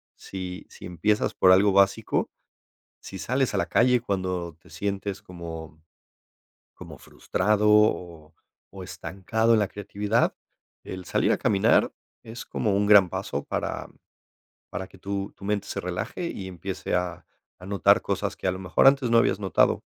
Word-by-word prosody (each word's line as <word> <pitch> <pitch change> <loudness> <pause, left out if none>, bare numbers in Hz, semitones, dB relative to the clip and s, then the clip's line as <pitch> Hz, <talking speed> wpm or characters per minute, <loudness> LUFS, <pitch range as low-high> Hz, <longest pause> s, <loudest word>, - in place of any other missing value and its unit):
si 95 -1 -7
si - - -12
empiezas 95 +5 0
por 95 - +5
algo 100 +2 +5
básico, 100 +2 +2 0.7
si 95 - -9
sales 130 - 0
a - - +1
la - - +1
calle 125 0 +3
cuando 90 -6 -3
te - - -20
sientes 100 0 -4
como 80 -4 -9 0.9
como - - -11
frustrado 105 +2 0
o 85 -7 +2 0.4
o 95 - -7
estancado 95 +6 -1
en 110 - +3
la 105 - 0
creatividad, 105 +2 -1 0.5
el 95 -1 -7
salir - - +1
a - - 0
caminar 100 -2 +3 0.3
es 115 +2 -8
como 100 -3 -1
un 100 0 +1
gran 100 -4 +7
paso - - -4
para - - -4 0.8
para 95 - -5
que 95 - -17
tu 100 +1 -4
tu 100 - -13
mente 105 -1 -1
se - - -3
relaje 90 - -4
y 95 - -7
empiece 95 +1 -5
a 90 -2 -2 0.3
a 90 - -13
notar 100 -4 +3
cosas - - -2
que - - -5
a 90 - +2
lo 95 - -6
mejor 90 +7 +2
antes 135 -2 +5
no 115 - +4
habías 105 - +2
notado. 95 -4 +2
95 Hz, 160 wpm, -25 LUFS, 90-105 Hz, 0.9 s, gran